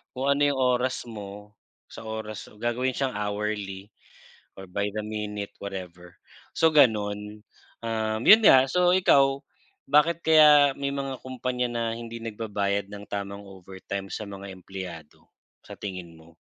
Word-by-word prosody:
Kung 130 - -3
ano 140 - +1
yung 140 - -1 0.2
oras 125 +1 0
mo 105 -2 -9 0.4
sa - - -9
oras 110 -1 -5
so 105 - -19
gagawin 120 +3 -1
siyang 135 -2 -1
hourly 105 -1 -3 0.7
or 95 - -8
by 100 +2 -2
the 110 - -2
minute, 105 -1 -4
whatever. 90 -3 -8 0.4
So 160 - +4
ganun, 105 -7 +2 0.4
um, 110 -1 -2
yun 220 +1 +9
nga, 130 0 +7
so 180 +2 +3
ikaw, 140 -7 +4 0.5
bakit 155 +4 +3
kaya 150 -3 +6
may 140 0 -2
mga 135 -2 -4
kumpanya 125 -1 -2
na 120 -1 -2
hindi 115 0 -7
nagbabayad 105 -3 -2
ng 105 0 -8
tamang 100 0 -5
overtime 95 +1 -7
sa 105 - -5
mga 100 0 -8
empleyado, 90 -4 -9 0.4
sa - - -10
tingin 90 -4 -7
mo? 80 0 -19
105 Hz, 145 wpm, -26 LUFS, 100-130 Hz, 0.7 s, yun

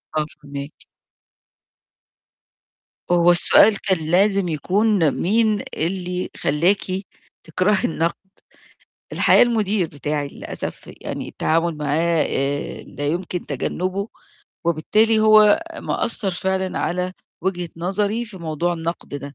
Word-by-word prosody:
آه، 155 -1 +1 0.2
فاهماكِ. 140 0 -7 2.4
هو 175 0 +5
السؤال 200 +4 +5
كان 190 -2 +1
لازم 195 +1 +3
يكون 185 +2 +2
مين 215 +4 +1 0.2
اللي 180 +2 -2
خلّاكِ 175 +7 +2 0.6
تكرهي 185 +5 +1
النَقد، 165 +1 0 1.0
الحقيقة - - +5
المدير 215 -5 +1
بتاعي 145 -1 -3
للأسف - - -7
يعني - - -5
التعامل 165 0 0
معاه 155 +2 +1
آآ، 140 +1 -2
لا 145 - -6
يمكن 175 +3 -3
تجنّبه، 185 - -3 0.6
وبالتالي 215 +7 +3
هو 215 +1 +6 0.2
مأثّر 215 -4 -1
فعلًا 190 +1 -2
على 180 +1 -1 0.3
وجهة 180 -2 -1
نظري 200 +6 -1
في 215 -4 -12
موضوع 170 +1 -2
النَقد 165 -2 -5
ده، 140 0 -7
180 Hz, 105 wpm, -21 LUFS, 155-200 Hz, 2.4 s, هو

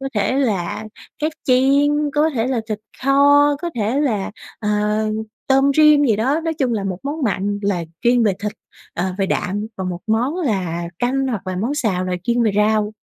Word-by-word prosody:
có 270 - -3
thể 205 +2 +1
là 205 -4 -1 0.3
cá 300 - 0 0.2
chiên, 285 +3 +3
có 305 +2 +3
thể 230 -1 0
là 255 -3 0
thịt 215 -1 -2 0.3
kho, 285 +1 +5
có 345 - -2
thể 230 +5 0
là, 220 -10 0 0.3
ờ, 210 - -3 0.8
tôm 270 +1 +4
rim 300 -1 +6
gì 225 -6 +3
đó. 265 +9 +1
Nói 325 -1 -1
chung 265 -5 0
là 210 -3 -1
1 190 -2 -3
món 290 +3 -4
mặn 205 -3 -1
là 195 -4 0 0.2
chuyên 240 0 +4
về 210 -3 +3
thịt, 210 0 -2 0.4
ờ, 175 - -1
về 195 - +1
đạm, 205 +2 -2
và 190 - -4
1 180 -1 -4
món 240 +8 0
là 190 - -1
canh 265 +2 0
hoặc 220 -7 -3
là 185 -1 -3
món 230 +9 -1
xào 210 -10 0
là 185 - -3
chuyên 240 0 +1
về 220 - +3
rau. 210 0 +2
235 Hz, 200 wpm, -20 LUFS, 205-280 Hz, 0.8 s, rim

